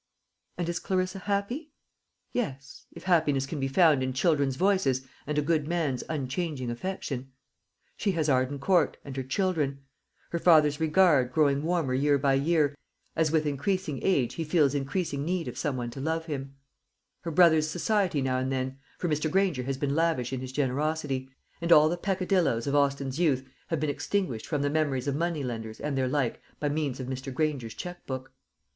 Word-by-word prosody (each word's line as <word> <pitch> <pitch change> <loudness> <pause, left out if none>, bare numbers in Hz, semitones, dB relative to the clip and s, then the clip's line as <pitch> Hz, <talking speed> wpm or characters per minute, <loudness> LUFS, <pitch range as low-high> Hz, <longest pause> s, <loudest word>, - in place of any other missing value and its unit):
And 175 - -2
is 170 -1 -1
Clarissa 185 0 -1
happy? 210 - -2 0.6
Yes, 140 - -4
if - - -11
happiness 155 -7 +2
can 145 +2 -5
be 135 - 0
found 150 -1 +4
in 130 0 -1
children's 140 -1 +2
voices 160 -8 +2 0.2
and 150 0 -2
a 150 - +2
good 155 -1 +1
man's 155 -7 -1
unchanging 140 -2 -2
affection. 135 -3 -4 0.7
She 200 - 0
has 160 -3 0
Arden 130 0 +2
Court, 170 +3 +2
and 135 -2 -7
her 135 - -2
children; 140 -1 -1 0.5
her 170 - -1
father's 150 -4 +5
regard, 155 -5 +4
growing 140 0 +3
warmer 165 -5 0
year 140 +2 +3
by 135 0 +2
year, 145 +1 +2 0.4
as 160 -2 +2
with 155 -1 +2
increasing 150 +1 -1
age 140 -11 +2
he 165 - -3
feels 155 -3 +3
increasing 145 +1 -2
need 175 +1 -1
of - - -5
some 145 -5 -2
one 120 -1 -3
to 135 - -7
love 160 +2 -1
him; 140 -3 -5 0.6
her 170 - -5
brother's 160 -2 +5
society 180 -3 +1
now 130 -1 +1
and 130 +1 -1
then 130 0 -2 0.2
for 175 - -2
Mr. 155 0 0
Granger 185 -6 +1
has 135 +1 -3
been 140 0 -1
lavish 160 -7 +1
in 130 - -2
his 130 -1 -6
generosity, 140 0 -1 0.3
and 170 0 -1
all 155 -1 +8
the 175 - 0
peccadilloes 180 - +1
of 140 - -1
Austin's 140 -1 +1
youth 135 -6 +2 0.2
have 165 - -1
been 155 - 0
extinguished 145 - -2
from 150 -3 -1
the 145 - +1
memories 145 -4 0
of 140 - 0
money 165 -1 -1
lenders 115 -3 -5
and 150 -1 -2
their 130 -1 +1
like 130 -2 -1 0.2
by 145 - 0
means 145 -3 -2
of 130 - -4
Mr. 130 +1 -5
Granger's 135 -5 -2
cheque 180 0 -7
book. 130 0 -5
145 Hz, 185 wpm, -28 LUFS, 135-170 Hz, 0.7 s, all